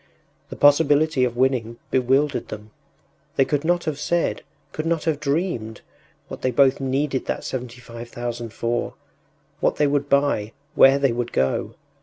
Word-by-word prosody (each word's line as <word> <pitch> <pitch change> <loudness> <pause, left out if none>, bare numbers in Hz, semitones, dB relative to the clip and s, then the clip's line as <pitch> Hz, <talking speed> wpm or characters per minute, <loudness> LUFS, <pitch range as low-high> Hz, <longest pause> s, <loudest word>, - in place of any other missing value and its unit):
The - - -7
possibility 145 -1 +4
of 120 -1 -4
winning 125 -3 0
bewildered 135 +3 +1
them; 105 0 -9 0.6
they 135 - +4
could 145 +1 -1
not 175 +1 +1
have 155 -3 -3
said, 170 +2 0 0.3
could 155 +1 -4
not 165 -1 0
have 160 -3 0
dreamed, 140 - -2 0.5
what - - -8
they 130 - +1
both 130 +2 +3
needed 135 0 -1
that - - -3
seventy 125 -1 -6
five 115 0 -10
thousand 120 -1 -5
for, 120 +1 -2 0.6
what - - +1
they 150 - +2
would 140 0 0
buy, 140 -7 +1 0.2
where 135 +1 +6
they 140 -2 +2
would 120 0 -3
go. 65 0 -1
135 Hz, 160 wpm, -23 LUFS, 120-145 Hz, 0.6 s, where